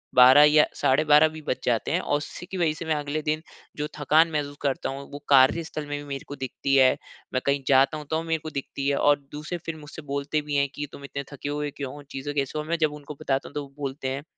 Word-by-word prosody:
12 130 +4 +9
या 150 0 +6 0.2
साढ़े 135 +4 +4
12 150 +1 +7
भी 155 0 -9
बज - - 0
जाते 115 -3 +1
हैं। - - +2
और 145 - +1
उसी 150 +4 -8
की 190 - -6
वजह 165 -3 +2
से 165 +2 -7
मैं 160 -1 +1
अगले 150 +1 -2
दिन 155 +1 -1 0.4
जो 150 0 -2
थकान 155 +3 +4
महसूस 145 -1 -3
करता 140 -2 -1
हूँ, 140 +1 -7
वो 145 - -7
कार्यस्थल 150 +3 +4
में 145 - -3
भी 145 - -8
मेरे 135 -1 -4
को 145 - -6
दिखती 135 +1 -1
है, 130 -1 +5 0.4
मैं 130 - +1
कहीं 140 0 +1
जाता 135 +3 +4
हूँ 150 - -8
तो 160 0 +1
मेरे 165 -1 -1
को 155 - -5
दिखती 140 -1 -4
है। 140 - +2
और 145 0 +4
दूसरे 155 +4 -5
फिर 165 - -3
मुझसे 150 +1 -10
बोलते 140 +2 -1
भी 150 -1 -4
हैं 140 0 +3
कि, 145 - -3
"तुम 140 - -11
इतने 140 0 -5
थके 140 +1 -5
हुए 145 0 -2
क्यों 140 -2 -5
हो, 145 - -10
चीज़ों 135 +2 -4
कैसे 145 +1 -1
हो?" - - -2
मैं 170 +1 -1
जब 150 - -10
उनको 150 0 -9
बताता 135 0 -1
हूँ, - - -20
तो 145 - -1
वो 140 -1 -14
बोलते 135 -1 -4
हैं 135 +2 -3
145 Hz, 265 wpm, -26 LUFS, 140-155 Hz, 0.4 s, 12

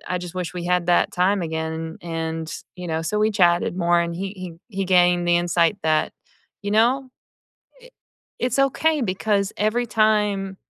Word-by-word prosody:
I - - +1
just 180 0 -8
wish 180 -1 -4
we 175 -1 -5
had 180 -1 +1
that 175 - +3
time 185 +2 +2
again," 160 0 -4
and, 165 -1 -4 0.2
you 180 -1 -7
know, 160 -1 -1
so 210 +6 -1
we 215 +1 +2
chatted 175 -2 +2
more 175 -1 +3
and 170 0 -3
he 195 +3 -4
he 185 +2 -11
he 195 - 0
gained 175 -1 +3
the 175 - +4
insight 175 +2 +1
that, 155 -1 +1 0.5
you 205 - -2
know, 255 +5 +2 0.7
it - - -17 0.5
it's 250 +1 -1
okay, 305 +3 +2
because 200 0 0
every 215 +4 0
time 210 -3 +1
180 Hz, 175 wpm, -22 LUFS, 170-210 Hz, 0.7 s, the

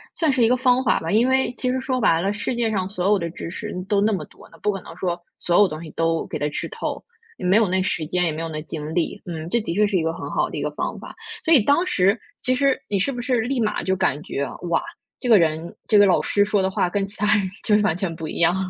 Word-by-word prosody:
算 320 -3 +2
是 260 -3 +2
一 - - +6
个 250 +2 +3
方 255 0 +3
法 - - +2
吧。 165 +1 -4
因 225 +4 +4
为 265 -2 +2
其 255 - -1
实 260 - -1
说 260 -1 -1
白 165 -6 +4
了， 195 +3 0
世 210 +4 -3
界 235 -2 0
上 190 -3 -1
所 190 -1 -1
有 205 -1 +4
的 170 -1 -3
知 165 - -7
识 210 +3 -6 0.2
都 205 -1 +2
那 215 +2 +3
么 195 - -2
多 - - -18
的， 165 - -18
不 210 - +1
可 195 -2 -5
能 - - -11
说 175 -1 -2 0.2
所 175 +2 +2
有 205 - +6
东 155 -1 -7
西 160 - -8
都 165 +1 0
给 - - -4
它 150 - 0
吃 - - -4
透， - - -5 0.3
也 - - -6
没 185 +2 +4
有 225 -2 +4
那 185 +1 +1
时 165 -3 -1
间， 180 +2 +1
也 165 - +1
没 155 +1 -5
有 165 - -3
那 155 -1 -4
精 155 -1 -6
力， 175 +3 -1
嗯， 165 -3 -5
这 235 +5 +1
的 170 - -3
确 210 +2 +4
是 200 -2 +1
一 165 - 0
个 160 - 0
很 175 - -6
好 - - 0
的 - - -6
一 - - -3
个 - - -2
方 - - -4
法。 - - -10 0.3
所 330 - +5
以 280 - +7
当 285 - +3
时 200 - +2 0.2
其 255 - +1
实 275 0 +2
你 205 - +1
是 210 +9 0
不 245 -2 -5
是 250 -1 +1
立 250 +3 -1
马 215 -2 0
就 190 - +1
感 180 -6 0
觉， 140 0 -3 0.2
哇， 165 - +2 0.4
这 250 - -3
个 225 - +8
人 165 -1 0
这 215 - +4
个 205 - +7
老 185 - +4
师 205 - +2
说 205 -1 +1
的 190 - +1
话 180 - +1
跟 195 +2 -1
其 200 +1 -12
他 210 - 0
人 195 -2 0 0.2
就 210 - +3
是 - - +2
完 185 -6 +2
全 180 -1 -3
不 160 -1 -6
一 - - -5
样。 170 +1 +4
195 Hz, 330 characters per minute, -22 LUFS, 170-230 Hz, 0.4 s, 个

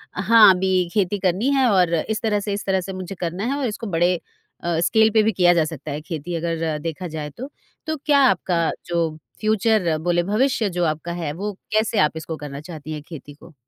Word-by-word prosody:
हाँ, 225 -2 +7
अभी 185 -1 +1
खेती 205 -1 0
करनी 190 +7 +1
है 265 -2 +3
और 180 -3 +3
इस 215 +7 -2
तरह 215 -2 +1
से, 205 0 -3
इस 200 - -4
तरह 190 -1 +1
से 190 +2 -6
मुझे 185 +1 -6
करना 175 +3 -3
है - - -2
और 275 - -1
इसको 225 +1 -5
बड़े 175 +2 +3 0.5
अ, 170 -1 0
स्केल 220 +5 +4
पे 220 - +5
भी 220 - +2
किया 175 -3 +4
जा 170 -2 +3
सकता 155 -3 -7
है 145 +2 -4
खेती 160 0 -6
अगर 165 -1 -2
देखा 165 +3 -5
जाए 155 -2 -5
तो। 255 - -8 0.4
तो 315 - -1
क्या 290 -2 +4
आपका 175 -4 0 0.2
जो 170 -1 0 0.3
फ्यूचर 215 -6 +2
बोले, 175 +2 0
भविष्य 215 +3 +1
जो 175 -1 -2
आपका 155 +2 -2
है 145 - -2
वो 205 +5 -4 0.2
कैसे 215 0 +1
आप 150 +1 +2
इसको 160 0 -5
करना 145 -2 -7
चाहती 155 -2 -9
हैं 150 - -6
खेती 150 -3 -10
को? 155 +3 -17
180 Hz, 220 wpm, -22 LUFS, 165-210 Hz, 0.5 s, हाँ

